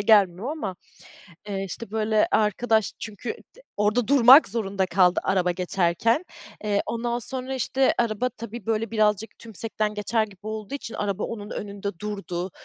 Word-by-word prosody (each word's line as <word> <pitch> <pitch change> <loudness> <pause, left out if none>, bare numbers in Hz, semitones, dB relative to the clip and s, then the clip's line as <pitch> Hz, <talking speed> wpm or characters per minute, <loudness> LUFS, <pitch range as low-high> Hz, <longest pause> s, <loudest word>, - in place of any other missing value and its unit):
gelmiyor 205 +1 +4
ama, 215 - -4 0.7
eee, 195 -1 -2
işte 195 +3 -7
böyle 215 0 +2
arkadaş 220 0 +2
çünkü 215 +2 -6 0.3
d - - -16 0.2
orada 210 +3 +1
durmak 270 0 +8
zorunda 195 -3 -1
kaldı 180 0 +3
araba 185 -2 +2
geçerken, 185 - +1 0.4
eee, 205 -1 +1
ondan 235 +1 -1
sonra 260 +2 -4
işte 265 +1 +2
araba 235 +1 +1
tabii 235 -1 -9
böyle 225 0 0
birazcık 215 -1 +1
tümsekten 215 -1 -3
geçer 215 +2 0
gibi 200 -3 -14
olduğu 215 +3 -5
için 270 -5 -6
araba 205 -1 -2
onun 210 -2 -6
önünde 200 -2 -5
durdu 195 -3 -4
215 Hz, 145 wpm, -25 LUFS, 200-230 Hz, 0.7 s, durmak